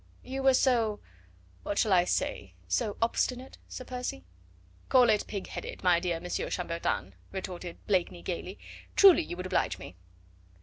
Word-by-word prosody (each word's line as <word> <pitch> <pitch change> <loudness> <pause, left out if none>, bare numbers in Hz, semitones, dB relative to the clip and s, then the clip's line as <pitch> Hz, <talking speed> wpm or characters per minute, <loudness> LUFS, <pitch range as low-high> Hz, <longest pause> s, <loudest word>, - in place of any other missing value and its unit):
"You 265 +1 -4
were 265 -1 +5
so 230 -6 +2 0.6
what 205 - -3
shall 210 -4 +3
I 175 -1 +5
say - - -2
so 220 -5 0
obstinate, 250 +2 -1
Sir 255 - -7
Percy?" 250 - -5 0.6
"Call 250 -3 +6
it 210 - +1
pig 200 -2 -4
headed, - - -7
my 180 -2 +5
dear 175 -2 -1
Monsieur 180 +1 -3
Chambertin," 170 - -2 0.2
retorted 180 -2 -6
Blakeney 180 -3 0
gaily, 185 +2 -4 0.4
"truly 385 -4 +8
you 175 - -6
would 180 - -5
oblige 110 - 0
me." 95 -1 -10
195 Hz, 150 wpm, -29 LUFS, 175-250 Hz, 0.6 s, truly